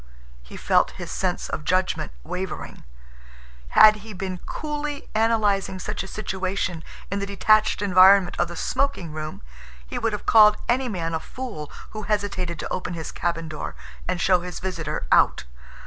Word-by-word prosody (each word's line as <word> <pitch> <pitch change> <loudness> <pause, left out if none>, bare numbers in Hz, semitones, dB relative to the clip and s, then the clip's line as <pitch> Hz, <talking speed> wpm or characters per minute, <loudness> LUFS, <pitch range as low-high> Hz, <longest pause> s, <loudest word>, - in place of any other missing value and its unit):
He 60 - -11
felt - - +3
his - - -6
sense - - -2
of - - -4
judgment 185 - 0
wavering. 180 - -6 0.9
Had 215 0 +9
he 215 +1 -10
been 185 -1 -4
coolly 295 -1 -4
analyzing 210 -4 +1
such 210 +3 -4
a 190 - -6
situation 190 -4 -3 0.3
in 200 - -1
the 200 - -3
detached 215 +2 +3
environment 190 -1 +6
of 175 - +2
the 175 - -8
smoking 270 - -1
room, 155 - -6 0.4
he - - -5
would 225 -1 0
have 210 - -5
called 210 -1 +7
any 250 +1 +1
man 165 -5 -3
a 160 - 0
fool 210 - -7 0.2
who 215 - -6
hesitated 200 -5 -2
to - - -4
open 180 -1 -3
his 160 -1 -5
cabin 165 -1 -2
door 155 -1 -6 0.3
and 180 -1 -1
show 180 +1 +4
his 180 0 -6
visitor 165 -5 -4
out. - - +4
190 Hz, 165 wpm, -24 LUFS, 175-215 Hz, 0.9 s, Had